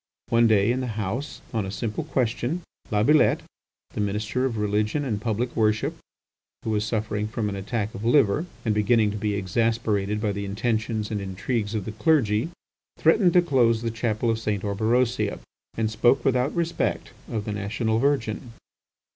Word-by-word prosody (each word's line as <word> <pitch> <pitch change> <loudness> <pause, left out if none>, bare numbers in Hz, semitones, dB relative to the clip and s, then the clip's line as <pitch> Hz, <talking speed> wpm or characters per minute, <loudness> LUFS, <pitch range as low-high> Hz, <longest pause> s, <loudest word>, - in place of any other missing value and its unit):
One 115 0 +5
day 105 0 +4
in 125 - 0
the 120 -4 -4
House, 115 +9 -3
on 110 -2 0
a 95 - -5
simple 105 +2 -3
question, 125 +7 -1 0.3
Labillette, 110 +9 +4 0.5
the - - -2
Minister 105 +5 -1
of 120 -4 -1
Religion 105 +7 0
and 105 -6 -2
Public 120 +2 -1
Worship, 110 -2 +1 0.7
who 110 - -2
was 105 -1 +1
suffering 105 -1 -1
from 110 -1 -2
an 100 - -4
attack 100 +2 -3
of 105 - -7
liver, 130 - +3 0.2
and 110 - +2
beginning 105 0 +3
to 105 - -4
be 105 0 -1
exasperated 105 +1 0
by 105 -1 0
the 100 0 -4
intentions 110 +1 -1
and 105 -2 -2
intrigues 105 +3 -2
of 105 -3 -2
the 110 - -4
clergy, 115 -1 +2 0.5
threatened 170 +2 +4
to 180 - +6
close 120 -7 +3
the 115 - -1
Chapel 115 0 0
of 115 - -1
St. 105 -3 -2
Orberosia, 110 +1 +1 0.4
and 110 -1 0
spoke 120 +4 +3
without 130 +1 +2
respect 170 -1 -1 0.2
of 110 -2 -2
the 105 - -3
National 110 +2 -1
Virgin. 120 -4 0
110 Hz, 170 wpm, -25 LUFS, 105-120 Hz, 0.7 s, to